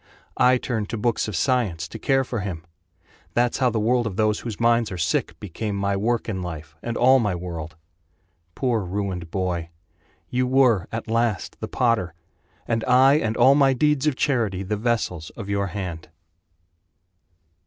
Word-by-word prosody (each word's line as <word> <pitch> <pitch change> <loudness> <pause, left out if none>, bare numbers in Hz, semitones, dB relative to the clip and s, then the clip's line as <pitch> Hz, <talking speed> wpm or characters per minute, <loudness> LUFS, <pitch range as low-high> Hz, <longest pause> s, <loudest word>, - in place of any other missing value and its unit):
I 125 0 +5
turned 110 -5 -3
to 115 - -3
books 115 +1 0
of 105 - -4
science 95 -5 0
To 115 - -8
care 135 +3 +2
for 125 -3 -4
him. 90 -4 -5 0.7
That's 120 +1 +1
how 130 -2 +3
the 110 -1 -1
world 120 +2 +2
of 100 - -5
those 110 0 +1
whose 115 -4 -6
minds 115 -2 +2
are 95 - -4
sick 85 - -1
Became 105 +2 -4
my 100 0 0
work 115 +4 0
in 95 -5 -3
life, 80 -3 -7
and 120 -1 -3
all 130 +2 +6
my 105 -6 0
world. 85 -3 -6 0.8
Poor 125 -4 +1
ruined 90 -2 -4
boy! 90 -2 -2 0.6
You 125 0 0
were, 125 -8 +3
at 115 0 -4
last, 115 -4 0
the - - -4
potter 110 -9 0 0.5
And 115 -1 0
I 130 +3 +5
and 110 -4 -2
all 130 +3 +6
my 140 -2 +4
deeds 150 +2 +1
of 150 - +2
charity 115 -10 0
The 105 +3 -2
vessels 105 -7 -1
of 105 -4 -7
your 100 -1 0
hand. 90 -5 -6
110 Hz, 175 wpm, -23 LUFS, 95-125 Hz, 0.8 s, all